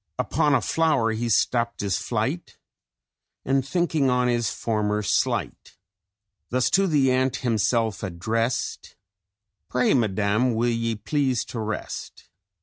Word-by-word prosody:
Upon 145 -1 +1
a - - +2
flower 155 -9 +1
he 115 +2 -2
stapt 115 +2 +1
his 100 -3 0
flight, - - -3 0.9
And 135 0 +2
thinking 155 -1 +1
on 125 0 +2
his 120 -3 +1
former 105 -2 -1
slight, - - -1 0.7
Thus 125 0 +1
to 195 0 +3
the 140 -6 +3
Ant 130 0 +1
himself 115 -2 +1
addrest: 110 +6 -2 0.7
'Pray, 125 +1 +2
Madam, 110 +1 +1
will 120 +2 +1
ye 115 0 -1
please 130 +2 -1
to 120 - -3
rest? 110 0 -6
120 Hz, 125 wpm, -24 LUFS, 110-130 Hz, 0.9 s, to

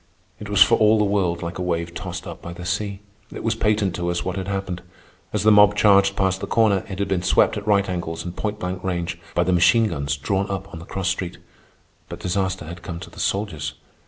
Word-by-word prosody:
It 105 - -8
was 105 -1 +7
for 115 +3 +2
all 110 +1 +5
the 105 - +3
world 95 -4 0
like 85 +2 -5
a - - -1
wave 85 -1 -2
tossed - - -6
up - - -8
by 85 - -7
the 90 +1 -8
sea. 100 +1 -2 0.3
It - - -7
was 115 - +1
patent 105 -4 +1
to 85 -1 -2
us 85 0 -2
what 95 - -2
had 95 -1 -4
happened. 95 -3 -3 0.5
As - - -1
the 110 - +6
mob 105 0 +7
charged 100 -1 +5
past 95 -1 0
the - - -3
corner, 105 -4 +3
it 95 - -5
had 100 - -1
been 95 -2 0
swept, 95 +4 +3
at 105 0 -6
right 100 -2 +3
angles 85 -3 -4
and 90 0 -6
point 105 -1 -3
blank 90 -1 -4
range, 85 -2 -2 0.2
by 85 - +3
the 90 +1 +1
machine 95 +6 +4
guns 70 -2 -2
drawn 95 +7 -1
up 100 0 -5
on 80 - -6
the 85 - -10
cross 95 -1 -2
street. 90 -2 -3 0.7
But 85 - -7
disaster 95 -1 -1
had 85 +2 -8
come 85 0 -6
to - - -10
the - - -13
soldiers. 80 -8 -2
95 Hz, 245 wpm, -23 LUFS, 85-100 Hz, 0.7 s, was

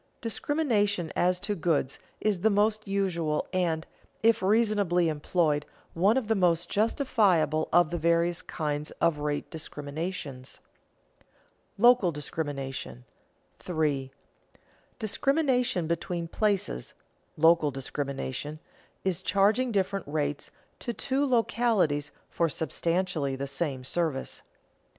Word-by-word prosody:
Discrimination 215 - 0
as 180 0 +2
to 205 - -1
goods 160 -7 0 0.2
is 210 -4 +1
the 215 +5 +3
most 215 +1 +1
usual 170 -6 0
and, 165 -3 0 0.4
if 225 -2 +4
reasonably 200 -4 +2
employed, 150 -1 +1 0.3
one 200 +8 +3
of 250 -5 -1
the 225 - +3
most 175 -5 +1
justifiable 200 - +2
of 175 -2 +4
the 175 - -2
various 170 +1 +2
kinds 150 -1 -3
of 170 -3 +2
rate 145 0 -2
discriminations. 145 -3 -5 0.6
[Sidenote: - - -32 0.5
Local 240 -4 +5
discrimination] 135 - -5 0.5
3. 150 -6 -1 0.9
_Discrimination 250 - +1
between 170 0 -2
places 195 - -1 0.4
(local 160 -1 +5
discrimination) 140 +1 -4 0.5
is 190 -2 0
charging 210 +6 +2
different 195 -3 -1
rates 145 -1 -2 0.3
to 240 - -4
two 270 +4 -1
localities 220 - +1 0.2
for 170 -1 0
substantially 165 -1 -1
the 135 +1 -3
same 140 -1 -3
service. 155 -1 -2
170 Hz, 110 wpm, -28 LUFS, 150-205 Hz, 0.9 s, Local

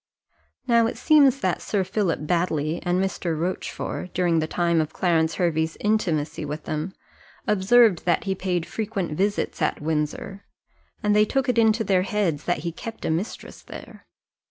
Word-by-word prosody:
Now 235 -2 +4
it - - -5
seems 280 -4 +4
that - - 0
Sir 200 -3 0
Philip 190 -3 -1
Baddely 165 -2 0
and 175 +1 0
Mr. 180 -4 -2
Rochfort, 180 0 -4
during 175 -2 +2
the 155 - -1
time 170 -1 +1
of 155 - -4
Clarence 165 -3 +1
Hervey's 160 -3 0
intimacy 170 -9 0
with 150 +1 -5
them, 155 +5 -3 0.5
observed 210 -1 +4
that 175 -2 +2
he 195 - -1
paid 180 -3 -2
frequent 205 -6 -3
visits 200 +6 -1
at - - 0
Windsor, 155 +6 -3 0.6
and 210 0 +3
they 210 0 +5
took 270 +5 -1
it 245 -2 +2
into 225 0 +3
their 190 -3 +2
heads 190 -7 -1
that 175 -4 0
he 170 - -1
kept 225 +7 -8
a - - 0
mistress 175 +8 -4
there. - - -12
180 Hz, 165 wpm, -24 LUFS, 160-210 Hz, 0.6 s, they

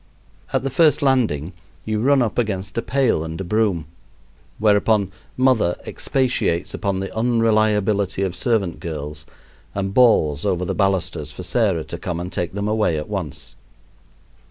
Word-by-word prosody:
At - - 0
the 135 - -2
first 150 +2 +3
landing 110 - +1 0.3
you 110 -1 -1
run 135 +2 +4
up 115 0 -1
against 95 -4 -2
a 115 - 0
pail 130 - +1
and 80 +1 -6
a - - -2
broom, 95 -4 0 0.7
whereupon 105 -1 +3 0.3
"mother" 125 -9 +3
expatiates 125 -10 -1
upon 100 -2 -2
the 95 - -6
unreliability 110 -4 +2
of 95 -2 -2
servant 100 -4 0
girls, 75 -2 -6 0.5
and 95 -1 -2
bawls 80 - +4
over 90 -3 0
the - - -2
balusters 90 -6 0
for 85 +5 -8
Sarah 95 -7 +1
to - - -7
come 85 -1 -3
and 90 +1 -6
take 90 0 -2
them 100 0 -2
away 105 -7 +1
at 75 - -5
once. 75 -10 -5
100 Hz, 155 wpm, -21 LUFS, 85-110 Hz, 0.7 s, run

